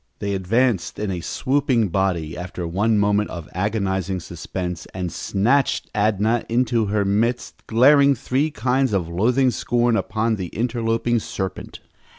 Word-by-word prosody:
They 100 Hz, 0 st, -3 dB
advanced 105 Hz, +2 st, 0 dB
in 105 Hz, -2 st, -2 dB
a 90 Hz, -2 st, -3 dB
swooping 130 Hz, -, 0 dB
body, 85 Hz, -3 st, -1 dB
after 90 Hz, 0 st, -6 dB
one 105 Hz, +6 st, +1 dB
moment 105 Hz, 0 st, +2 dB
of 85 Hz, -2 st, -7 dB
agonizing 95 Hz, -1 st, -1 dB
suspense, 90 Hz, +1 st, -6 dB
and 90 Hz, -2 st, -3 dB
snatched 120 Hz, -, 0 dB
Adnah 110 Hz, +2 st, +1 dB
into 120 Hz, -2 st, +1 dB
their 100 Hz, 0 st, 0 dB
midst, 115 Hz, +5 st, -1 dB
glaring 140 Hz, +4 st, +5 dB
three 135 Hz, +6 st, 0 dB
kinds 130 Hz, -1 st, 0 dB
of 90 Hz, -4 st, 0 dB
loathing 125 Hz, +9 st, +2 dB
scorn 120 Hz, -1 st, +1 dB
upon 110 Hz, 0 st, 0 dB
the 95 Hz, -2 st, -4 dB
interloping 115 Hz, +2 st, 0 dB
serpent. 95 Hz, -3 st, -6 dB
105 Hz, 140 wpm, -22 LUFS, 95-120 Hz, -, glaring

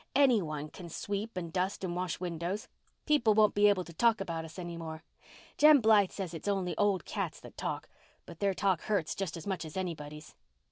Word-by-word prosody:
any 260 Hz, -6 st, +5 dB
one 155 Hz, -3 st, -4 dB
can 170 Hz, +2 st, -10 dB
sweep 200 Hz, +5 st, -4 dB
and 170 Hz, -2 st, -4 dB
dust 190 Hz, +2 st, -1 dB
and 175 Hz, -2 st, -2 dB
wash 180 Hz, -1 st, -2 dB
windows. 175 Hz, +3 st, -3 dB, 0.4 s
People 240 Hz, -9 st, +4 dB
won't 215 Hz, -1 st, +5 dB
be 205 Hz, 0 st, +5 dB
able 190 Hz, -3 st, +2 dB
to 170 Hz, -, -12 dB
talk 230 Hz, +6 st, +3 dB
about 165 Hz, -4 st, -3 dB
us 160 Hz, +2 st, -10 dB
any 175 Hz, -2 st, -5 dB
more. 160 Hz, -1 st, -7 dB, 0.6 s
Jem 300 Hz, -1 st, +8 dB
Blythe 215 Hz, -4 st, +5 dB
says 185 Hz, -4 st, -5 dB
it's 165 Hz, -, -7 dB
only 190 Hz, -4 st, 0 dB
old 200 Hz, -2 st, +1 dB
cats -, -, -3 dB
that -, -, -13 dB
talk, -, -, -4 dB, 0.4 s
but 165 Hz, -, -11 dB
their 200 Hz, -1 st, +1 dB
talk 190 Hz, -3 st, +1 dB
hurts 200 Hz, -8 st, 0 dB
just 185 Hz, -4 st, -3 dB
as 165 Hz, -, -9 dB
much 190 Hz, -5 st, -2 dB
as 160 Hz, +2 st, -8 dB
anybody's." 155 Hz, -4 st, -5 dB
185 Hz, 205 wpm, -31 LUFS, 165-205 Hz, 0.6 s, Jem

